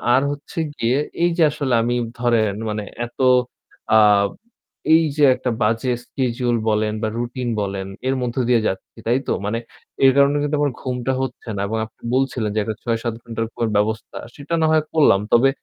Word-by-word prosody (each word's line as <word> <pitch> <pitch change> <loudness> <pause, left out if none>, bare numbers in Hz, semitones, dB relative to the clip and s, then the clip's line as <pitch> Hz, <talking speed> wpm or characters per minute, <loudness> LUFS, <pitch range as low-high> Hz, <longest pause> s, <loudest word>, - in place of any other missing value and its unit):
আর 130 - +4
হচ্ছে 145 +3 -7 0.2
গিয়ে 120 +3 +1 0.3
এই 175 - +4
যে 170 - +5
আসলে 140 -4 -2
আমি 120 +1 0 0.2
ধরেন 115 -4 +2 0.2
মানে 105 0 -3 0.2
এত 120 - -15 0.8
আ - - +8 1.0
এই 160 +1 +6
যে 150 - +3
একটা 125 - -3
বাজে 115 +3 +1
schedule 120 -1 -1
বলেন 105 0 +1
বা - - +1
routine 120 0 -3
বলেন 95 -1 -3 0.2
এর 135 - +1
মধ্য 120 0 -3
দিয়ে 120 -2 +4
যাচ্ছি 95 - -5
তাই 120 +3 +3
তো? - - +1
মানে 110 +3 -1 0.5
এর 135 - +8
কারণে 140 +1 +4
কিন্তু 145 +1 0
আমার 145 -3 +1
ঘুমটা 125 0 -2
হচ্ছে 125 -2 -5
না 100 - -1
এবং 110 +2 -2
আপনি 110 - -21
বলছিলেন, 130 -5 0
যে - - +2
একটা 110 -1 -3
৬-৭ 115 -1 -1
ঘণ্টার 115 -1 -3
ঘুমের 115 -2 -1
ব্যবস্থা। 110 +1 -1 0.2
সেটা 145 +4 -7
না - - +4
হয় 155 -1 +3
করলাম। 145 -11 +5
তবে 130 +3 +6
120 Hz, 185 wpm, -21 LUFS, 110-135 Hz, 1.0 s, আ